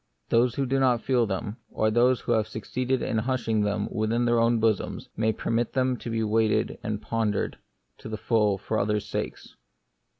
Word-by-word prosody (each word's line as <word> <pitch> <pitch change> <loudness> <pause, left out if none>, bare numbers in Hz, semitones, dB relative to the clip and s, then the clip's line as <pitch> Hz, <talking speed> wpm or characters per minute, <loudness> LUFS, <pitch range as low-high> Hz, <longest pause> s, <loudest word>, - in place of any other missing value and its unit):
Those 120 +1 +3
who 140 - 0
do 135 +1 +1
not 125 -4 +2
feel 125 -4 +2
them, 105 +3 -3
or 110 0 +1
who 120 +2 +2
have 110 -2 +2
succeeded 125 +4 -2
in 110 - 0
hushing 115 -2 0
them 105 0 0
within 115 +2 0
their 120 -1 +3
own 115 0 +3
bosoms, 110 -3 0
may 110 0 +2
permit 115 +1 -1
them 130 -1 +1
to 120 - -7
be 115 0 0
weighed 110 0 +1
and 105 -1 -3
pon 115 -1 0
dered - - -2 0.5
to - - -8
the 110 - -4
full 105 -2 +2
for 110 +3 -2
others' 105 0 0
sakes. - - -5
115 Hz, 190 wpm, -26 LUFS, 110-120 Hz, 0.5 s, Those